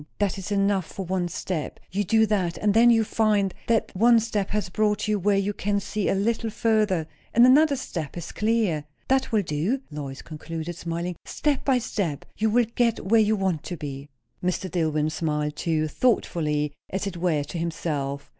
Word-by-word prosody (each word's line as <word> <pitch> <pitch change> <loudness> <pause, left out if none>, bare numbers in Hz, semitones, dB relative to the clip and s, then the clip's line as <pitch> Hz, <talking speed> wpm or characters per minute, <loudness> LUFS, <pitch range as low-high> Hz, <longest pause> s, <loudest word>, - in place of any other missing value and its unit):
That 200 -1 0
is 190 +2 -6
enough 195 -3 +1
for 195 - -6
one 180 0 -1
step. 175 -2 -4
You 200 +2 0
do 220 +3 +4
that; 190 -5 0
and 210 -1 +1
then 235 +2 +6
you 225 -1 +5
find 210 -3 +1
that 230 -2 +2
that - - -23
one 230 +4 +6
step 210 -3 -2
has 210 -1 -1
brought 210 +2 0
you 210 -1 +1
where 200 +1 +2
you 200 +1 0
can 205 0 0
see 200 +1 -2
a - - +2
little 225 +3 0
further, 215 -6 +1 0.3
and 240 +2 +8
another 285 +3 +6
step 170 - -5
is 170 -1 -6
clear. 210 -9 0 0.2
That 265 0 +2
will 215 -3 +2
do," 170 - -1
Lois 140 -2 -6
concluded, 165 +1 -6
smiling; 170 +1 -4
"step 295 -3 -1
by 265 -2 +3
step, 200 - -2
you 220 +1 +1
will 240 +2 +3
get 235 -4 +1
where 220 +3 +5
you 215 0 +3
want 190 -6 0
to 175 - -5
be." 140 -1 -7 0.3
Mr. 180 0 -1
Dillwyn 155 -3 0
smiled 150 -2 -1
too, 155 -2 0
thoughtfully, 150 - 0 0.2
as 190 +1 -2
it 195 -3 -4
were, 170 -4 +1
to 165 +4 -6
himself. 145 -4 -3
195 Hz, 190 wpm, -25 LUFS, 165-220 Hz, 0.3 s, and